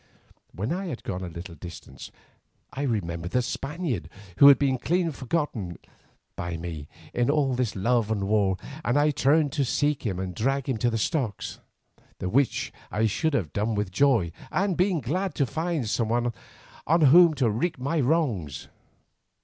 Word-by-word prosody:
When 105 - -3
I 190 +2 -3
had 140 -8 -6
gone 95 -1 -4
a 90 - -4
little 85 +1 -8
distance 85 0 -10 0.6
I 135 - -4
remembered 90 -9 -2
the 125 - +2
Spaniard, 135 - -3 0.3
who 140 - +9
had 140 - +9
been 135 -3 +1
clean 170 +4 +1
forgotten 130 - -3 0.6
by 85 -1 -4
me 80 -3 -6 0.3
in 120 +1 +1
all 145 -3 +2
this 125 -4 -1
love 115 +2 +1
and 105 -3 -1
war, 100 -3 +2 0.3
and 120 - +1
I 150 +1 +4
turned 145 +2 +3
to 145 -4 0
seek 145 +3 0
him 100 -7 -2
and 95 -1 -4
drag 135 +7 -1
him 130 -4 0
to 120 +2 +1
the 115 - -1
stocks, 115 - -2 0.6
the 90 - -3
which 135 +6 +1 0.2
I 110 +2 0
should 145 +8 0
have 95 - -2
done 105 +2 0
with 105 -2 -2
joy, 110 -6 +3 0.2
and 195 -1 +1
been 180 -2 +1
glad 175 +8 -2
to 140 - +2
find 160 -1 -2
some 110 +1 0
one 120 +1 +1 0.5
on 165 +2 +4
whom 160 +3 +7
to 130 -4 +2
wreak 140 +10 -1
my 140 +6 -1
wrongs. 120 - 0
125 Hz, 175 wpm, -26 LUFS, 100-150 Hz, 0.6 s, who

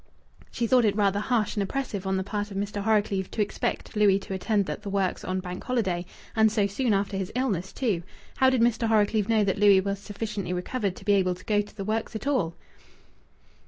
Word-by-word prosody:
She 235 - -2
thought 250 +1 +4
it 210 -2 +2
rather 200 -1 +2
harsh 225 0 0
and 205 - 0
oppressive 200 -2 -3
on 190 0 +1
the 190 - -1
part 205 +1 -3
of 195 - -6
Mr. 205 0 -2
Horrocleave 205 -3 +1
to 220 - -2
expect 205 - -3
Louis 205 -2 +5
to 195 - -6
attend 200 +1 0
at - - -4
the 205 - -6
works 195 -2 -1
on 185 0 -2
Bank 180 0 -6
Holiday 190 -8 -1 0.3
and 220 -1 +4
so 210 -2 +2
soon 220 +5 0
after 200 0 0
his 190 -1 -3
illness, 200 -8 -1
too! 215 -10 -1 0.4
How 260 - +5
did 260 -3 +2
Mr. 230 -1 +2
Horrocleave 215 -1 +2
know 220 -2 +4
that 200 0 0
Louis 200 -2 +7
was 200 +1 -2
sufficiently 205 -3 -4
recovered 195 +2 -2
to - - -13
be 205 - +4
able 185 -2 +2
to 185 - -16
go 210 -1 +2
to 205 - -12
the 195 - -4
works 220 +2 -2
at 220 - -5
all? 255 - 0
205 Hz, 225 wpm, -27 LUFS, 195-220 Hz, 0.4 s, Louis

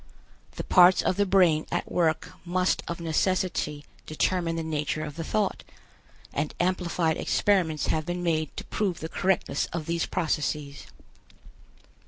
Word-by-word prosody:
The - - -5
parts 180 +1 +6
of - - +1
the 205 +1 +1
brain 180 -5 +4
at - - -2
work 160 -3 +1
must 180 +1 +1
of 170 - -4
necessity 165 -2 -1 0.2
determine 165 +2 0
the 165 - -2
nature 155 -1 -2
of 150 -2 -8
the 165 - -4
thought, 205 +4 -1 0.7
and 145 +1 -2
amplified 175 -3 0
experiments 175 -7 +1
have 155 0 -1
been 175 0 -3
made 155 -2 -1
to - - -4
prove 190 -5 -2
the 160 - -5
correctness 190 0 0
of 165 -2 -5
these 170 +1 -1
processes. 150 -3 -2
170 Hz, 145 wpm, -27 LUFS, 155-185 Hz, 0.7 s, parts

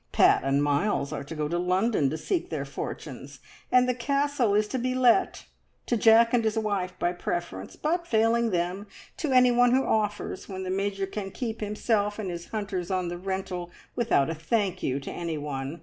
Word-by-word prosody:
Pat - - +4
and 135 +1 +2
Miles 145 +1 0
are - - -4
to 150 +3 -8
go 150 -1 -1
to 170 +3 -1
London 180 - +1
to 155 - -3
seek 345 - -2
their - - -3
fortunes, - - -7 0.3
and 250 0 +5
the 250 - +2
Castle 275 -2 +1
is 210 0 +2
to 260 - -2
be 255 +1 -1
let 255 +8 +3 0.4
to 240 - +1
Jack 230 +1 +5
and 240 -2 +3
his 220 0 0
wife 195 -4 -1
by 175 - 0
preference, 175 - -4
but, 340 +3 -1
failing 230 0 +2
them, 180 +2 -2 0.3
to 300 - -2
anyone 245 -1 +5
who 265 +1 +3
offers, 210 -1 -1
when 190 -1 -5
the 185 - -3
Major 195 0 -1
can 195 0 -5
keep 225 +2 -5
himself 210 0 0
and 200 -4 -3
his 170 0 -7
hunters 200 -5 -4
on 185 -2 -1
the 175 - -4
rental 185 -2 -4 0.3
without 230 - +2
a 165 - -2
`Thank 195 +4 -1
you' 135 +1 -1
to 140 - -7
anyone. 150 -3 -4
200 Hz, 195 wpm, -27 LUFS, 175-235 Hz, 0.4 s, and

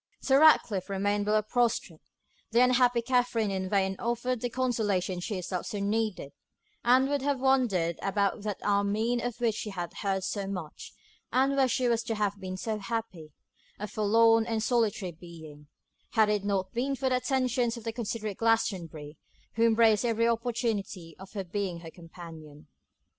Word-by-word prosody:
Sir 270 0 +3
Ratcliffe 220 - +4
remained 205 +1 0
below 215 0 +2
prostrate. 225 -7 0 0.5
The 235 +2 +4
unhappy 250 -1 +3
Katherine 245 -4 +1
in 190 -1 -3
vain 195 -1 +1
offered 240 +1 -1
the 245 - -1
consolation 215 -7 -1
she 200 +4 -4
herself 180 -1 -4
so 210 - -4
needed; 205 -7 -1 0.5
and 255 +2 +4
would 285 -1 0
have 280 -1 0
wandered 235 -11 +1
about 200 +1 0
that 210 -2 -3
Armine 210 +4 +1
of 245 -1 -4
which 235 -2 +1
she 215 - -5
had 175 -4 -5
heard 195 -2 -1
so 195 +1 -3
much, 180 -6 -7 0.4
and 270 +2 +2
where 270 -1 +4
she 255 0 0
was 230 -1 +2
to 225 - -2
have 205 -1 -1
been 185 -1 -5
so 220 +1 -3
happy, 195 -7 -5 0.5
a 210 - -5
forlorn 225 +2 +3
and 225 -1 -1
solitary 220 -6 0
being, 160 -3 -13 0.5
had 220 -2 +4
it 210 -1 0
not 195 -2 -1
been 265 +4 -1
for 265 0 -1
the 255 - +2
attentions 250 -2 0
of 230 - -9
the 225 0 -3
considerate 215 -3 -4
Glastonbury, 170 -10 -1 0.4
who 230 +2 +3
embraced 225 -1 +4
every 230 -1 +1
opportunity 225 -7 -2
of 190 0 -11 0.2
being 190 -4 -3
her 165 -1 -9
companion. 165 -3 -12
215 Hz, 165 wpm, -29 LUFS, 190-240 Hz, 0.5 s, Ratcliffe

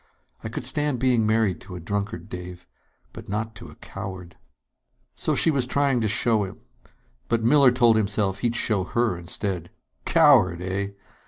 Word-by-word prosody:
I 110 - -4
could 115 - -5
stand 145 +1 +1
being 120 -3 +2
married 110 -6 +1
to 90 -1 -10
a - - -6
drunkard, 100 +4 -4
Dave, 90 -2 -8 0.5
but - - -11
not 110 +2 -3
to 85 - -10
a 75 - -13
coward 90 -2 -8 0.4
..." - - -58 0.3
So - - -1
she 165 - +4
was 135 -4 0
trying 135 -2 +1
to 110 - +1
show 110 +1 +2
him. 95 - -8 0.7
But 115 -1 +1
Miller 135 +2 +6
told 120 -2 +4
himself 100 -2 0
he'd 120 +1 -1
show 105 -5 +1
her 115 +1 0
instead. 85 0 -4 0.4
Coward, 90 -2 +5
eh? 100 +2 -3
105 Hz, 170 wpm, -24 LUFS, 95-120 Hz, 0.7 s, Miller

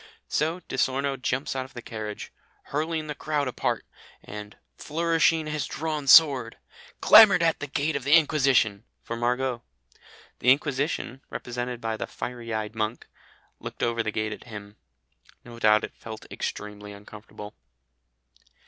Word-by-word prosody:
So 160 +4 -1
Di 130 - -7
Sorno 135 +1 +1
jumps 130 +1 -2
out 130 - -1
of 130 - -17
the 120 - -6
carriage, 110 -2 -6 0.4
"hurling 155 +1 -1
the 150 - -4
crowd 150 -1 -2
apart," 125 - -2 0.4
and, 105 0 -9 0.2
"flourishing 165 0 +1
his 150 -1 -3
drawn 155 -2 -4
sword," 135 -6 +6 0.4
"clamoured 205 -6 +8
at 165 -1 +2
the 145 - -5
gate 145 +3 -1
of 140 - -2
the 140 +2 +2
Inquisition" 135 -10 +3 0.2
for 115 - -5
Margot. 125 +1 -1 0.8
The 125 - +2
Inquisition, 135 -1 -1
represented 120 0 -5
by 110 -1 -2
the - - -4
fiery 120 -2 -6
eyed 110 -1 -3
monk, 110 +1 -3 0.5
"looked - - -7
over 115 0 +1
the 110 - -2
gate 110 0 -2
at - - -11
him." 105 -2 -10 0.7
No 120 -1 -11
doubt 110 -1 +4
it - - -6
felt 110 -1 -9
extremely 105 0 -6
uncomfortable. 105 0 -11
125 Hz, 150 wpm, -26 LUFS, 110-150 Hz, 0.8 s, clamoured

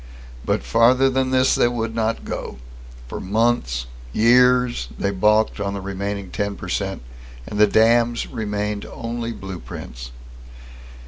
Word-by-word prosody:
But - - 0
farther 125 +4 +4
than 130 0 0
this 130 0 +3
they - - +3
would 115 -2 -2
not 115 0 -1
go. - - -5 0.5
For - - -6
months, 100 - 0 0.3
years, 125 - +4
they 100 - 0
balked 105 +3 +2
on 100 0 -2
the - - -3
remaining 100 0 -4
ten 100 0 -2
per 95 - -8
cent, 95 -5 -2 0.4
and 105 - -5
the 105 - +7
dams 115 +2 +3
remained 105 -1 -3
only 115 0 -5
blueprints. 60 - -8
110 Hz, 135 wpm, -22 LUFS, 100-120 Hz, 0.5 s, the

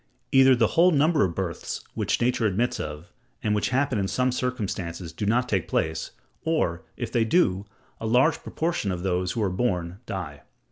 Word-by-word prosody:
Either 135 -1 +7
the 120 -2 +3
whole 175 +2 +6
number 155 0 +3
of 85 -3 -1
births 90 -4 -4
which - - 0
nature 120 -2 +2
admits 110 +5 0
of, 75 +3 -6 0.3
and 105 -2 +1
which 105 - +1
happen 130 -3 +1
in 95 - 0
some 125 +5 +1
circumstances, 95 -10 -3
do 100 +5 -3
not 120 +3 +2
take 95 -7 0
place; 80 0 -1 0.3
or, 155 - 0 0.2
if - - -4
they 115 - +2
do, 105 - +2 0.3
a 110 - -3
large 130 +7 +3
proportion 160 - -2
of 90 -1 -4
those 90 -1 0
who 110 - -1
are 95 - 0
born, 90 -3 -1
die. 80 -7 -5
105 Hz, 185 wpm, -26 LUFS, 90-125 Hz, 0.3 s, Either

